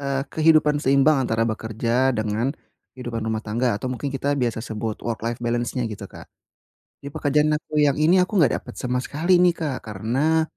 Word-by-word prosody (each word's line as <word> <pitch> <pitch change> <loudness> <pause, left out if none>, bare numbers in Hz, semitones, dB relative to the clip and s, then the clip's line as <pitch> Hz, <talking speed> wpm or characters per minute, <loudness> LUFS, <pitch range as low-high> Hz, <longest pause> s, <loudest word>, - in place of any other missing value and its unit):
eee, 140 -1 -1
kehidupan 155 -2 +3
seimbang 140 +2 +4
antara 115 -3 0
bekerja 115 +3 0
dengan, 110 +3 -1 0.5
kehidupan 120 -3 -5
rumah 110 0 -3
tangga 115 0 0
atau 115 - -5
mungkin 140 +3 -4
kita 140 +1 -1
biasa 120 -2 -1
sebut 110 0 -4
work 115 -2 -2
life 115 +1 -2
balance-nya 120 +1 -1
gitu 105 -3 -7
Kak. - - -12 0.8
Di 140 - -8
pekerjaan 150 +2 +1
aku 150 0 -3
yang 145 -2 +3
ini 165 +5 +4
aku 185 +4 0
enggak 150 - +3
dapet - - -12
sama 125 0 -2
sekali 170 +7 +1
nih 175 -1 +4
Kak 145 -7 -3
karena, 130 +11 +1
130 Hz, 180 wpm, -23 LUFS, 115-150 Hz, 0.8 s, seimbang